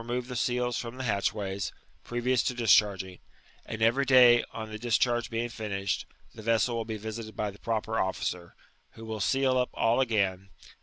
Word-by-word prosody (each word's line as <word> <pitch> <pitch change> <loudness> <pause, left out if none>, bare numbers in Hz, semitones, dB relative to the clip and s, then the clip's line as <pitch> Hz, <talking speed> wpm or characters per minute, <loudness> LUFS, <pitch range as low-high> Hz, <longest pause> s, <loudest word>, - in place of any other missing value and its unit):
21 120 +1 -3
die - - -5
seal0 125 0 0
from 120 +1 -6
the 130 - -4
hftlcbwaj^s, 100 -3 -1 0.3
previous 120 +1 0
to 125 - -2
dischai^ng; 100 -5 +3 0.5
and 110 0 -3
every 120 +5 +3
day, 125 -3 +7
on 110 -1 -7
the 110 - -6
discharge 120 0 +1
bem^ 115 +1 -2
'finished, 100 -4 -3 0.3
the 110 - -10
vessel 115 +1 +1
will 115 -1 -2
be 110 -1 -4
visited 110 +1 -7
hy 105 -1 -1
the 100 - -16
proper 110 0 -2
officer, 90 -2 -3 0.4
who 115 - -11
will 110 -1 -5
seal 130 +4 +2
all 115 +2 +2
up - - +6
again. 100 -5 -1
115 Hz, 175 wpm, -28 LUFS, 105-120 Hz, 0.5 s, day